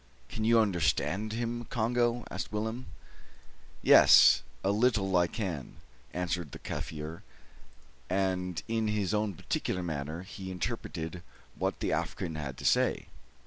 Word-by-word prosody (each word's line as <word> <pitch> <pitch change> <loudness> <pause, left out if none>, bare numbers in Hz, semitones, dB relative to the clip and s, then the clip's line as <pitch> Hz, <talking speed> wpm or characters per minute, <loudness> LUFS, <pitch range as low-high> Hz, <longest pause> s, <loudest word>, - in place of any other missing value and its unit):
"Can 110 - -4
you 115 0 +5
understand 100 +1 +1
him, 120 +1 -3
Congo?" 120 +1 0
asked - - -4
Willem. 110 +4 -3 1.0
"Yaas, - - +8 0.2
a 95 - +2
little 105 -3 +2
I 85 -1 +4
can," 85 - -4 0.4
answered 90 -4 -3
the - - -6
Kaffir; 80 +1 -6 0.9
and 90 -2 -1
in 115 -1 0
his 105 -2 0
own 105 -2 0
peculiar 90 +3 -2
manner 80 +1 -4
he 95 0 -8
interpreted 85 -1 -4 0.3
what - - -2
the - - 0
African 90 -4 -2
had 70 -4 -5
to - - -8
say. - - +2
95 Hz, 130 wpm, -30 LUFS, 85-110 Hz, 1.0 s, Yaas